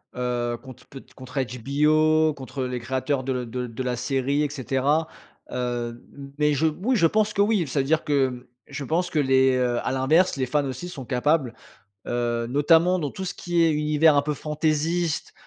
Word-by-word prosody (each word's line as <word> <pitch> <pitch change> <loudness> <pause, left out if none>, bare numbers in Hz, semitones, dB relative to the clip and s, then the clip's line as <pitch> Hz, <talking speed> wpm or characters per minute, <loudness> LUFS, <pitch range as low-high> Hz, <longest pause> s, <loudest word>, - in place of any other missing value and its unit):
heu, 120 -1 -2
contre 130 -2 -13
pe 135 - -10 0.2
contre 130 +1 -6
HBO, 155 +5 +2
contre, 135 -1 -7
heu, 130 - -1
les 125 0 -3
créateurs 130 +3 -2
de 135 - -1
l 120 - -9
de 125 +2 -4
l 115 - -10
de 130 - -4
la 125 -1 -1
série 135 +3 0
et 150 - -1
cetera, 140 +3 0 0.4
heu, 120 -1 -3 0.4
mais 150 0 +2
je 150 +3 +2
oui 190 +12 0
je 170 -7 +4
pense 210 +3 +1
que 200 - +1
oui. 205 -5 +2
Ça 140 +2 -1
veut 135 - +1
dire 155 +3 +1
que, 130 -4 0 0.2
je 145 - -6
pense 175 +5 0
que 155 - 0
les, 130 -1 +3
heu 125 -1 +1
à - - 0
l'inverse 145 +7 +2
les 130 - 0
fans 145 +3 0
aussi 135 +6 -5
sont 155 -7 -8
capables, 130 0 0 0.5
heu, 120 -1 -1
notamment 165 +7 +3
dans 145 -4 -3
tout 190 - -6
ce 190 - -4
qui 175 -2 -1
est 165 - +4
univers 150 0 +3
un - - +4
peu 150 +1 -2
fantaisiste, 155 +2 -1
140 Hz, 205 wpm, -24 LUFS, 125-155 Hz, 0.5 s, je